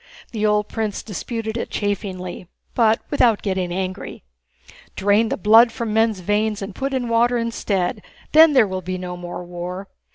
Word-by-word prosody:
The 215 -2 0
old 210 0 +1
prince 215 -2 -3
disputed 220 +2 -4
it - - -4
chaffingly, 185 -3 -4 0.3
but 225 -1 +3
without 235 -7 +3
getting 185 -3 -1
angry. 185 +1 -5 0.7
"Drain 205 +3 +2
the - - -2
blood 225 +4 +6
from 225 -2 -4
men's 220 -3 +2
veins 210 +2 0
and 195 0 -6
put 270 +7 -3
in 260 -2 -1
water 235 +1 +2
instead, 210 -5 -1 0.3
then 315 0 +7
there 255 -5 +6
will 190 -1 -4
be 185 +1 -4
no 180 -1 -6
more 175 0 -7
war! 180 +2 -6
210 Hz, 165 wpm, -21 LUFS, 185-230 Hz, 0.7 s, then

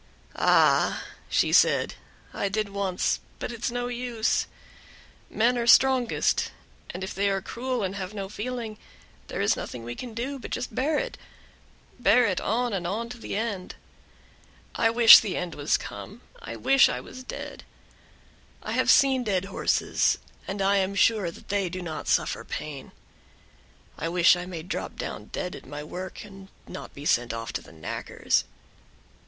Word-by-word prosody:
"Ah!" - - +4 0.3
she - - +2
said, - - +4 0.4
"I 200 - -1
did 215 +1 -1
once, 195 -2 -1 0.2
but - - -4
it's 235 +1 -3
no 245 0 -2
use; 245 -2 -1 0.8
men 240 +2 +2
are 235 - -1
strongest, 260 -1 +4 0.4
and 180 +2 -6
if 190 - -4
they 200 +1 +1
are 195 0 0
cruel 250 +3 -3
and 190 0 -2
have 185 -1 -4
no 200 -2 -5
feeling, 220 +1 -5 0.5
there - - -3
is - - +3
nothing 120 -2 -6
that - - -10
we 120 - -4
can 235 - -8
do, 265 +4 -3
but - - -8
just 250 - -4
bear 290 +5 +1
it - - -3 0.8
bear 245 +1 +5
it 185 -5 0
on 240 +2 0
and 175 -3 -2
on 225 +5 -3
to 245 -1 -9
the - - -5
end. 205 -4 -3 1.0
I 225 - +3
wish 230 -1 +10
the 210 -4 -3
end 180 -2 -3
was 145 +1 +1
come, 215 +5 -9 0.2
I - - -7
wish 270 -1 +5
I - - -2
was 255 - -10
dead. - - -7 1.0
I - - -4
have - - +1
seen 270 -3 +5
dead 195 -4 0
horses, 195 - +1 0.3
and 195 0 -2
I 200 +1 +3
am 195 0 0
sure 205 -2 +3
they 195 +2 -3
do 185 +2 -5
not 160 -2 -5
suffer - - +1
pain; 145 -3 -6 1.1
I 165 - -2
wish 175 +1 +5
I 175 0 -5
may 170 -3 -6
drop 185 - -4
down - - -5
dead 180 - -5
at - - -12
my 145 +2 -6
work, 180 +4 -7
and 195 -1 -12 0.2
not - - -8
be 140 - -9
sent 120 -5 +2
off 115 0 -5
to - - -3
the - - -15
knackers." 80 -1 -1
200 Hz, 170 wpm, -26 LUFS, 180-240 Hz, 1.1 s, wish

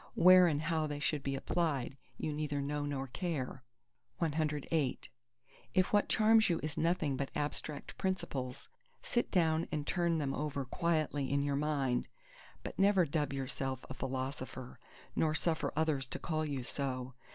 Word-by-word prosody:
Where 185 0 +8
and 150 -2 0
how 160 -1 +1
they 145 -1 -3
should 150 -1 0
be 135 0 -2
applied 140 -3 -1 0.2
you 155 - -2
neither 145 -1 -2
know 145 +1 -1
nor 135 -2 -2
care. 140 -3 -3 0.6
CIX 155 -3 0 1.1
If 185 +2 +3
what 205 - +4
charms 220 0 +5
you 170 - +1
is 155 -1 -2
nothing 165 -4 +1
but 140 +1 -2
abstract 150 0 -3
principles, 135 -9 -2 0.4
sit 240 - 0
down 165 -3 +2
and 150 -2 -2
turn 170 -1 +1
them 140 -3 -1
over 145 -2 -2
quietly 155 -2 0
in 140 0 +2
your 140 -1 0
mind: 140 -4 0 0.6
but - - -7
never 195 -2 +5
dub 145 -1 -1
yourself 135 -1 -3
a - - -2
Philosopher, 130 -1 -5 0.4
nor 155 -1 +2
suffer 160 0 +1
others 155 -4 +1
to 125 - -5
call 155 -2 -1
you 140 -3 -3
so. 130 -1 -3
150 Hz, 155 wpm, -34 LUFS, 135-165 Hz, 1.1 s, Where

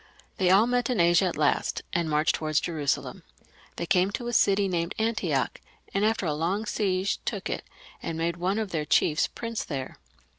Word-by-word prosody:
They 185 -2 +2
all 195 +4 +6
met 245 0 0
in 245 - 0
Asia 170 +2 +5
at 180 - -2
last, 150 -1 +1
and 170 -3 0
marched 150 +1 +2
towards 155 -1 0
Jerusalem. 155 -5 -2 0.5
They 170 - -3
came 180 +2 +3
to 240 - -3
a - - -4
city 200 -2 +4
named 175 0 -2
Antioch, 220 0 -1 0.3
and 195 - +1
after 220 -2 +1
a 155 - 0
long 180 +8 -1
siege 195 -2 0
took - - -3
it, - - -3 0.4
and 165 - -4
made 170 +1 -1
one 185 +4 0
of 215 -3 -2
their 160 -3 -1
chiefs 150 +1 +2
Prince 230 -1 -4
there. 135 -4 -5
180 Hz, 190 wpm, -27 LUFS, 160-210 Hz, 0.5 s, all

